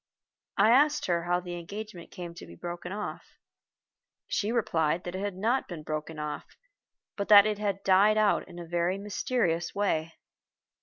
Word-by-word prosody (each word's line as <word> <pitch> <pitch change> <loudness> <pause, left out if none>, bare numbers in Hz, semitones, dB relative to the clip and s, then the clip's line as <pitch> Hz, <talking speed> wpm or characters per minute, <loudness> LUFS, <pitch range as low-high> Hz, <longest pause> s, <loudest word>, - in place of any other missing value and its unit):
I 215 +3 +5
asked 295 +4 +4
her 170 -1 0
how 175 0 +1
the 175 -1 -7
engagement 200 0 -8
came 175 -3 -8
to 170 - -11
be 85 - -12
broken 175 - -6
off. 210 +1 -6 0.9
She 210 +2 -1
replied 170 -8 +1
that 175 - -5
it 185 - -4
had 200 -2 -3
not 230 +8 0
been 165 -4 -7
broken 155 +1 -4
off, 150 -1 -6 0.6
but 200 - -3
that 205 -1 +9
it 210 -1 -1
had 200 -2 -2
died 200 +3 +5
out 215 -1 +2
in 175 - -12
a 175 - -7
very 175 +2 0
mysterious 200 -4 -1
way. 165 -5 0
185 Hz, 170 wpm, -29 LUFS, 170-210 Hz, 0.9 s, that